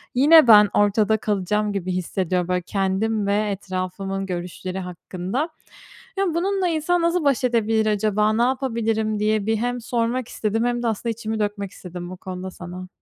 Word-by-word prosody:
yine 300 Hz, +2 st, +7 dB
ben 210 Hz, -2 st, +8 dB
ortada 210 Hz, +1 st, +3 dB
kalacağım 210 Hz, 0 st, -1 dB
gibi 185 Hz, -2 st, -2 dB
hissediyorum, 180 Hz, 0 st, -1 dB
böyle, 180 Hz, 0 st, 0 dB
kendim 200 Hz, +3 st, -1 dB
ve 205 Hz, +1 st, +1 dB
etrafımın 195 Hz, 0 st, -4 dB
görüşleri 180 Hz, +1 st, -5 dB
hakkında. 185 Hz, -, -4 dB, 0.7 s
Ya, 390 Hz, -, +2 dB
bununla 380 Hz, +1 st, 0 dB
insan 335 Hz, +2 st, +1 dB
nasıl 340 Hz, 0 st, +1 dB
baş 275 Hz, -3 st, +2 dB
edebilir 225 Hz, -2 st, +2 dB
acaba, 215 Hz, 0 st, +2 dB
ne 235 Hz, -, +2 dB
yapabilirim 225 Hz, -4 st, 0 dB
diye 215 Hz, -1 st, +1 dB
bir 220 Hz, 0 st, +2 dB
hem 220 Hz, -, -3 dB
sormak 245 Hz, -, +1 dB
hem 245 Hz, -, -5 dB
sormak 235 Hz, +1 st, -1 dB
istedim 220 Hz, +2 st, -1 dB
hem 240 Hz, 0 st, 0 dB
de, -, -, +1 dB
aslında, 230 Hz, +1 st, -1 dB
içimi 220 Hz, 0 st, -4 dB
dökmek 205 Hz, -2 st, -2 dB
istedim 180 Hz, -2 st, -8 dB
bu 185 Hz, -, -7 dB
konuda 185 Hz, 0 st, -6 dB
sana. 180 Hz, +1 st, -8 dB
210 Hz, 170 wpm, -23 LUFS, 190-235 Hz, 0.7 s, ben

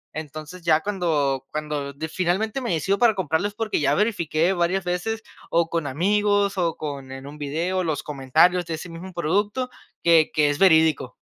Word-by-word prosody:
Entonces, 155 Hz, +3 st, -7 dB
ya 160 Hz, -2 st, +3 dB
cuando 155 Hz, -9 st, 0 dB
cuando 150 Hz, -2 st, -3 dB
de 150 Hz, +3 st, -5 dB
finalmente 190 Hz, +9 st, -1 dB
me 240 Hz, -, -2 dB
decido 190 Hz, +5 st, +1 dB
para 235 Hz, -3 st, +4 dB
comprarlo, 180 Hz, 0 st, 0 dB
es -, -, -15 dB
porque 220 Hz, 0 st, -1 dB
ya 145 Hz, 0 st, +2 dB
verifiqué 175 Hz, -5 st, +1 dB
varias 180 Hz, +1 st, 0 dB
veces 215 Hz, +6 st, -2 dB, 0.3 s
o 165 Hz, 0 st, +2 dB
con 165 Hz, -4 st, -1 dB
amigos, 200 Hz, +6 st, +1 dB
o 170 Hz, -3 st, 0 dB
con 140 Hz, -3 st, -6 dB
en 135 Hz, 0 st, -8 dB
un 150 Hz, +1 st, -10 dB
video 165 Hz, +6 st, -1 dB
los 160 Hz, -4 st, -1 dB
comentarios 150 Hz, +6 st, +2 dB
de 165 Hz, -, -3 dB
ese 160 Hz, +3 st, -8 dB
mismo 170 Hz, +3 st, -8 dB
producto, 205 Hz, +9 st, -1 dB, 0.3 s
que 165 Hz, -2 st, +5 dB
que 150 Hz, -1 st, +3 dB
es 145 Hz, -, -3 dB
verídico. 160 Hz, -5 st, +4 dB
170 Hz, 180 wpm, -23 LUFS, 150-195 Hz, 0.3 s, que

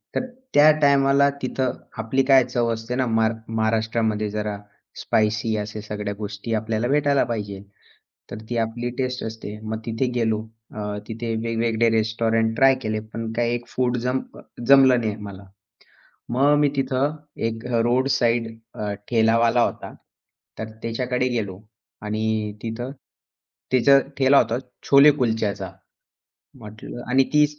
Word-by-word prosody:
तर -, -, 0 dB, 0.3 s
त्या 150 Hz, +1 st, +7 dB
टायमाला 140 Hz, 0 st, +4 dB
तिथं 130 Hz, 0 st, -1 dB, 0.3 s
आपली 115 Hz, +4 st, 0 dB
काय 135 Hz, -1 st, +6 dB
चव 120 Hz, -1 st, -1 dB
असते 115 Hz, +2 st, -5 dB
ना. 130 Hz, -1 st, +1 dB
मार 110 Hz, 0 st, +2 dB
महाराष्ट्रामध्ये 110 Hz, -1 st, 0 dB
जरा 105 Hz, 0 st, -3 dB, 0.4 s
स्पायसी 110 Hz, +1 st, +1 dB
अशा 105 Hz, 0 st, -5 dB
सगळ्या 105 Hz, -1 st, -4 dB
गोष्टी 105 Hz, +2 st, -5 dB
आपल्याला 110 Hz, +2 st, -1 dB
भेटायला 145 Hz, 0 st, +2 dB
पाहिजे. 100 Hz, -3 st, -4 dB, 0.7 s
तर 105 Hz, -, -5 dB
ती 120 Hz, -, -2 dB
आपली 115 Hz, +2 st, -2 dB
टेस्ट 125 Hz, -1 st, -2 dB
असते. 110 Hz, -1 st, -6 dB
मग 110 Hz, 0 st, -4 dB
तिथे 115 Hz, +3 st, -1 dB
गेलो 110 Hz, -1 st, 0 dB, 0.3 s
अ, 105 Hz, -, -6 dB, 0.3 s
तिथे 115 Hz, +1 st, -5 dB
वेगवेगळे 115 Hz, 0 st, +1 dB
रेस्टॉरंट 110 Hz, 0 st, +1 dB
ट्राय 135 Hz, +2 st, +5 dB
केले, 110 Hz, -1 st, -2 dB
पण 110 Hz, +1 st, -6 dB
काय 120 Hz, 0 st, 0 dB
एक 120 Hz, 0 st, -4 dB
फूड 125 Hz, -1 st, -1 dB
जम 130 Hz, +1 st, +1 dB, 0.2 s
अ, -, -, -11 dB, 0.3 s
जमलं 135 Hz, -3 st, +7 dB
नाही 110 Hz, -2 st, -2 dB
मला. 100 Hz, -1 st, -9 dB, 0.9 s
मग 140 Hz, +5 st, +3 dB
मी 145 Hz, -1 st, +3 dB
तिथं 135 Hz, +2 st, 0 dB, 0.3 s
एक 115 Hz, +1 st, -6 dB
अ, 120 Hz, -2 st, +1 dB
रोड 125 Hz, +3 st, +2 dB
साइड 115 Hz, -1 st, +1 dB, 0.3 s
अ, 105 Hz, -1 st, -3 dB, 0.2 s
ठेलावाला 115 Hz, +1 st, +3 dB
होता. -, -, -4 dB, 0.7 s
तर 110 Hz, 0 st, -4 dB
त्याच्याकडे 125 Hz, +2 st, -1 dB
गेलो 100 Hz, -6 st, -3 dB, 0.4 s
आणि 110 Hz, 0 st, -2 dB
तिथं 120 Hz, +3 st, -4 dB, 0.8 s
त्याचा 135 Hz, +2 st, +6 dB, 0.2 s
ठेला 135 Hz, +1 st, +5 dB
होता 115 Hz, -1 st, +3 dB, 0.3 s
छोले 140 Hz, +2 st, +8 dB
कुलच्याचा. 110 Hz, -8 st, -1 dB, 0.9 s
म्हटलं 110 Hz, +2 st, -9 dB
आणि 135 Hz, +1 st, +4 dB
ती 150 Hz, 0 st, +6 dB
115 Hz, 140 wpm, -23 LUFS, 110-125 Hz, 0.9 s, छोले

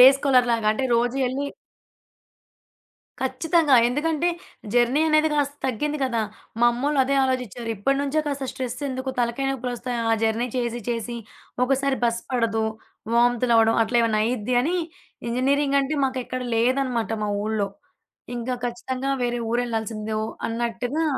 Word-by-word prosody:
Day 250 Hz, -, +12 dB
స్కాలర్స్‌లాగా 245 Hz, -5 st, +3 dB
అంటే 260 Hz, +4 st, -2 dB
రోజు 245 Hz, +2 st, +1 dB
ఎళ్లి 280 Hz, +2 st, -2 dB, 1.7 s
ఖచ్చితంగా. 290 Hz, +3 st, +2 dB
ఎందుకంటే, 310 Hz, +5 st, 0 dB, 0.5 s
జర్నీ 245 Hz, +4 st, +3 dB
అనేది 310 Hz, 0 st, +4 dB
కాస్త 285 Hz, -1 st, 0 dB
తగ్గింది 295 Hz, +5 st, -1 dB
కదా! 235 Hz, -3 st, 0 dB, 0.4 s
మా 240 Hz, -, +6 dB
అమ్మోళ్లు 280 Hz, +4 st, -1 dB
అదే 275 Hz, -, 0 dB
ఆలోచిచ్చారు. 250 Hz, -3 st, -2 dB
ఇప్పటినుంచే 275 Hz, +7 st, +1 dB
కాస్త 280 Hz, -2 st, -2 dB
స్ట్రెసెందుకు 260 Hz, +1 st, -3 dB
తలకాయనొప్పులొస్తాయి. 245 Hz, 0 st, -1 dB
ఆ -, -, +4 dB
జర్నీ 225 Hz, +2 st, +1 dB
చేసి 240 Hz, -1 st, -1 dB
చేసి. 235 Hz, 0 st, -3 dB, 0.5 s
ఒకసారి 270 Hz, +1 st, +1 dB
బస్ 235 Hz, 0 st, +1 dB
పడదు. 225 Hz, -3 st, +1 dB, 0.5 s
వాంతులవడం. 235 Hz, -1 st, +4 dB
అట్లేమన్నా 230 Hz, -2 st, +2 dB
అయిద్ది 245 Hz, 0 st, -1 dB
అని. 345 Hz, +6 st, 0 dB, 0.5 s
ఇంజినీరింగ్ 275 Hz, +3 st, +2 dB
అంటే, 280 Hz, +3 st, -1 dB
మాకెక్కడ 255 Hz, -1 st, -3 dB
లేదనమాట 245 Hz, -1 st, +1 dB
మా 205 Hz, -, -1 dB
ఊళ్లో. 215 Hz, -2 st, 0 dB, 0.7 s
ఇంగ 240 Hz, +2 st, -3 dB, 0.2 s
ఖచ్చితంగా 260 Hz, +3 st, -3 dB
వేరే 240 Hz, 0 st, -1 dB
ఊరెళ్లాల్సిందే. 225 Hz, -2 st, -2 dB
ఓ -, -, -2 dB, 0.2 s
అన్నట్టుగా 240 Hz, +6 st, -2 dB
250 Hz, 120 wpm, -24 LUFS, 235-275 Hz, 1.7 s, Day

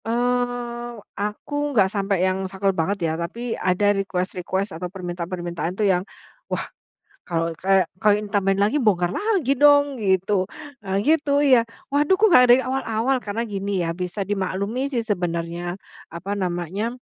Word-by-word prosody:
Eee, 240 Hz, 0 st, -1 dB, 0.2 s
aku 210 Hz, +7 st, -5 dB, 0.2 s
enggak 200 Hz, -6 st, +4 dB
sampai 195 Hz, -2 st, +1 dB
yang 190 Hz, 0 st, -1 dB
saklek 195 Hz, 0 st, 0 dB
banget 185 Hz, +4 st, 0 dB
ya. 160 Hz, -, 0 dB
Tapi 230 Hz, +7 st, -4 dB
ada 195 Hz, +3 st, +2 dB
request-request 190 Hz, 0 st, -2 dB
atau 180 Hz, -, -3 dB
permintaan-permintaan 175 Hz, -1 st, -4 dB
tuh 215 Hz, -, +1 dB
yang, 180 Hz, -, +1 dB, 0.5 s
"Wah -, -, -2 dB, 0.6 s
kalau 165 Hz, -1 st, -1 dB
kayak 190 Hz, -1 st, +2 dB
kalau 210 Hz, -1 st, +4 dB
ini 210 Hz, -, -7 dB
tambahin 195 Hz, -1 st, +2 dB
lagi 205 Hz, +7 st, +2 dB
bongkar 185 Hz, -7 st, +2 dB
lagi 395 Hz, -, +1 dB
dong 285 Hz, 0 st, +5 dB
gitu, 190 Hz, -1 st, +1 dB, 0.4 s
eee, 190 Hz, 0 st, -1 dB
gitu 290 Hz, -1 st, +3 dB
iya. 260 Hz, -4 st, +6 dB, 0.3 s
Waduh 295 Hz, +6 st, +3 dB
kok 440 Hz, -, +6 dB
nggak 255 Hz, -9 st, +7 dB
dari 250 Hz, -, +6 dB
awal-awal." 260 Hz, -1 st, 0 dB
Karena 210 Hz, +2 st, -2 dB
gini 200 Hz, -1 st, -2 dB
ya, 165 Hz, 0 st, -3 dB
bisa 180 Hz, +3 st, -4 dB
dimaklumi 200 Hz, +7 st, -2 dB
sih 245 Hz, -, +1 dB
sebenarnya, 175 Hz, -4 st, -3 dB, 0.4 s
apa 170 Hz, +4 st, -6 dB
namanya, 185 Hz, +4 st, -2 dB
200 Hz, 150 wpm, -23 LUFS, 185-240 Hz, 0.6 s, nggak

